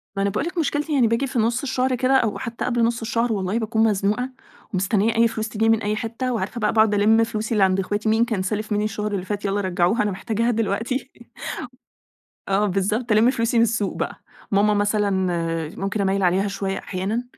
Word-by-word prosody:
ما 195 - -1
أنا 200 - +2
باقول 235 - -2
لِك 350 +1 -5
مشكلتي 300 -1 -1
يعني 255 -5 +4
باجي 230 +5 0
في 250 -2 -2
نص 230 +3 +1
الشهر 260 -1 0
كده 255 +2 +1
أو 220 -5 0
حتى 235 -1 -4
قبل 240 -1 +1
نص 235 +1 0
الشهر 230 +1 0
والله 195 +2 -1
باكون 220 0 +1
مزنوقة 210 +3 +1 0.4
ومستنية 200 +4 +1
أي 230 +1 +5
فلوس 220 -1 -4
تيجيني 225 +1 +1
من - - -8
أي 210 +1 0
حتّة 230 +3 -3
وعارفة 225 +2 -3
بقى 210 -2 +1
باقعد 220 -1 +4
ألم 215 +2 +4
فلوسي 220 0 -3
اللي 210 -3 +3
عند 190 0 +3
أخواتي، 205 +3 -1
مين 225 +2 +3
كان 220 -6 -2
سالف 215 +3 -3
مني 210 0 +1
الشهر 210 0 -2
اللي 190 -3 -3
فات 205 +1 -4
يالّا 200 +1 0
رجعوها 185 +3 +1
أنا 210 - 0
محتاجاها 230 +4 -1
دلوقتي 230 +4 -2 1.4
آه 195 +2 +2
بالضبط 210 +5 -1
ألم 215 +3 +5
فلوسي 230 -1 0
من 230 - +6
السوق 215 -3 0
بقى. - - -3 0.3
ماما 205 +1 +3
مثلًا 205 0 +1 0.7
ممكن 195 +1 -2
أميّل 195 0 +1
عليها 185 +3 +2
شوية 195 -1 -3
أحيانًا؛ 200 +6 -3
215 Hz, 205 wpm, -22 LUFS, 200-230 Hz, 1.4 s, من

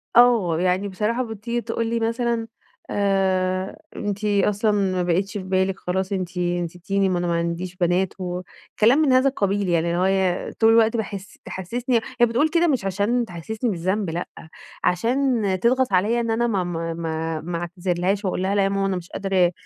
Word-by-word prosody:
آه، 225 -9 +5
يعني 185 +2 +1
بصراحة 220 +6 -1
بتيجي 235 +1 -4
تقول 230 0 -2
لي 230 0 0
مثلًا 230 0 -1 0.4
آآ، 190 -2 0 0.2
أنتِ 205 0 -3
أصلًا 210 +1 +2
ما 190 -3 +1
بقيتش 185 +3 0
في 190 - -5
بالِك 190 0 0
خلاص، 190 +2 -2
أنتِ 185 -2 -3
أنتِ 175 0 0
نسيتيني، 190 +3 -1
ما 180 -1 0
أنا 175 - -1
ما 170 - +1
عنديش 170 +2 -2
بنات، 180 +1 +1
وكلام 185 +8 0
من 280 -5 +4
هذا 260 +2 +5
القبيل 200 -5 0
يعني، 170 0 +2
اللي 170 +1 0
هوي 190 -1 +1
طول 225 0 +4
الوقت 225 0 +4
باحس 200 -2 -5
تحسسني 235 +6 -1 0.2
هي 240 - +7
بتقول 245 +7 +1
كده 340 +1 +3
مش 260 -10 0
علشان 205 +6 +1
تحسسني 215 +7 -4
بالذنب، 190 +1 -1
لأ، 170 +2 -3 0.6
علشان 240 +5 +1 0.2
تضغط 245 0 +2
عليَّ 215 +6 +3
إن 230 -1 -1
أنا 235 +1 +1
ما 195 -5 0
ما 165 -1 -3
ما 160 -1 -3
ما 170 +1 -4
أعتذرلهاش 180 +3 -1
وأقول 185 0 -1
لها 195 +2 0
لأ 200 - +3
يا 195 - +2
ماما 195 0 0
أنا 195 -1 0
مش 175 -1 -9
قادرة 190 -3 +1
195 Hz, 185 wpm, -23 LUFS, 180-225 Hz, 0.6 s, هي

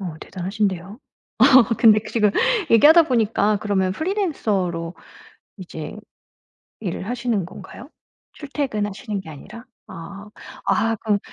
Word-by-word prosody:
어 175 -5 -5
대단하신데요. 190 +1 -3 0.4
어 - - +7 0.3
근데 215 -2 +6
그 220 - -10
지금 210 -3 +2 0.4
얘기하다 305 +9 +7
보니까 220 -5 +1
그러면 190 -3 0
프리랜서로 205 - -2 0.6
이제 160 -5 -8 0.9
일을 190 -1 -5
하시는 235 -5 -2
건가요 245 - -12 0.4
출퇴근하시는 215 -7 -4
게 170 - -12
아니라? 195 +10 -11 0.2
아. 195 +5 -10 0.4
아 225 0 +1
그럼 210 -1 0
210 Hz, 275 characters per minute, -21 LUFS, 185-230 Hz, 0.9 s, 어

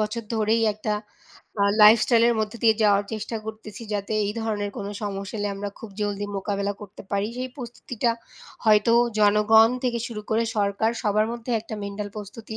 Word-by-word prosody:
বছর 215 +2 -2
ধরেই 220 +1 +2
একটা 215 +1 -5 0.7
আ - - +5 0.2
লাইফ 215 +2 +9
স্টাইলের 235 -1 +4
মধ্যে 215 +1 -3
দিয়ে 220 -1 +5
যাওয়ার 205 -1 +4
চেষ্টা 220 +1 -4
করতেছি 220 0 -8
যাতে 205 +1 -3
এই 205 - -2
ধরনের 205 -2 -2
কোনো 200 0 -4
সমস্যা 200 +1 -4
এলে 205 0 -1
আমরা 200 +1 -5
খুব 225 - -9
জলদি 205 0 -2
মোকাবিলা 200 +1 -2
করতে 205 -1 -11
পারি, 200 +1 +1
সেই 255 0 -3
প্রস্তুতিটা 240 -2 -3 0.5
হয়তো 215 +1 +5 0.3
জনগণ 210 +2 +5
থেকে 235 -1 0
শুরু 220 -3 -6
করে 220 +1 +2
সরকার 205 +2 +1
সবার 215 0 +2
মধ্যে 235 +1 -6
একটা 220 0 -8
মেন্টাল 200 +1 -5
প্রস্তুতি 220 +2 -8
215 Hz, 170 wpm, -24 LUFS, 205-225 Hz, 0.7 s, লাইফ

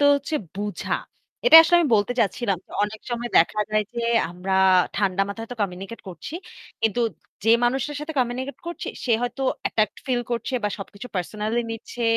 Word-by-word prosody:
হচ্ছে 280 +2 -3 0.2
বুঝা। 205 +1 -3 0.5
এটাই 325 -10 +12
আসলে 345 +2 +4
আমি 325 - +2
বলতে 205 +3 +1
চাচ্ছিলাম। 200 -2 0 0.3
অনেক 215 +1 -7
সময় 240 0 -2
দেখা 210 +6 +3
যায় 215 0 +2
যে 235 - -2 0.3
আমরা 180 +2 -4 0.4
ঠান্ডা 195 -1 +1
মাথায় 225 +3 -5
হয়তো 245 +1 -9
কমিউনিকেট 195 +3 -5
করছি। 180 - -8 0.5
কিন্তু 225 +1 +1 0.4
যে 225 - +4
মানুষের 265 +4 0
সাথে 305 +2 -5
কমিউনিকেট 255 +2 -1
করছি 345 - -5 0.2
সে 245 - +2
হয়তো 245 +2 -3 0.2
অ্যাটাকড 215 -2 +1
ফিল 250 -2 +1
করছে 240 +2 -2
বা - - +3
সবকিছু 200 +3 -8
পার্সোনালি 215 +5 -1
নিচ্ছে 230 +2 -6
225 Hz, 165 wpm, -24 LUFS, 205-250 Hz, 0.5 s, এটাই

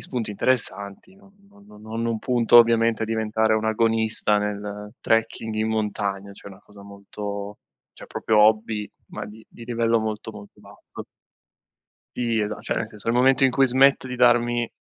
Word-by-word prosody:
spunti 120 -5 -4
interessanti 105 - -2
non 200 0 -21 0.3
no 200 - -17
no 110 +2 -9
non 115 -1 -1
punto 120 0 +3
ovviamente 115 -1 +4
a - - +1
diventare 110 0 0
un 110 0 0
agonista 110 -1 +1
nel 105 +1 -5
trekking 115 0 0
in 110 +1 -1
montagna, 100 -2 -3
cioè 100 - -12
una 95 0 -14
cosa 105 -1 -17
molto 100 0 -7 0.3
cioè - - -13
proprio 110 -1 0
hobby 110 0 +2 0.2
ma - - -7
di 110 +1 -13
di 115 - -13
livello 115 -1 +1
molto, 110 +1 -5
molto 105 -1 -14
basso. - - -12 1.2
Sì 115 -2 0
esa 105 0 -3
cioè - - -2
nel 110 - -2
senso 105 0 -7
nel 115 - +1
momento 130 +1 +4
in 135 - +4
cui 135 +2 +3
smetto 130 +1 +3
di 125 - -5
darmi, 120 -1 +3
110 Hz, 170 wpm, -23 LUFS, 105-115 Hz, 1.2 s, ovviamente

